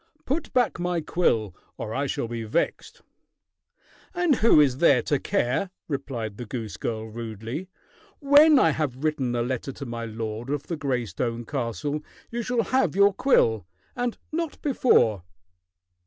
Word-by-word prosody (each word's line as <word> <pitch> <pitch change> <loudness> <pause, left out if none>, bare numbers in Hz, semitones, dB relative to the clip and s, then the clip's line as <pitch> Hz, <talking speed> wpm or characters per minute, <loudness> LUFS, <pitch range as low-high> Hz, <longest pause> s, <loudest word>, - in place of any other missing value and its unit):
Put 295 +5 -2
back 245 -7 +1
my 175 -1 0
quill, 115 - 0 0.2
or 110 - -5
I 140 +4 -1
shall 120 - -2
be 115 0 -4
vexed." 110 +10 -2 1.1
"And 350 -7 +2
who 225 -7 +5
is 135 -3 +3
there 135 -8 +5
to 145 - 0
care?" 125 +12 0 0.2
replied 120 -8 -4
the 120 - -6
goose 110 -5 -5
girl 110 -1 -4
rudely. 115 - -6 0.5
"When 290 +1 +7
I - - +5
have 140 -3 -3
written 135 -6 0
a 120 - +1
letter 130 +2 -3
to 140 - -7
my 115 -1 -5
lord 110 +2 -5
of 145 0 -2
the 170 - -4
gray 135 -5 -1
stone 115 +4 -3
castle, 145 +3 -3 0.3
you 235 +1 -2
shall 240 0 0
have 260 - +1
your 200 0 +5
quill 110 - +2 0.3
and 245 -1 -2
not 330 -1 -3
before." 120 - +3
135 Hz, 155 wpm, -25 LUFS, -, 1.1 s, When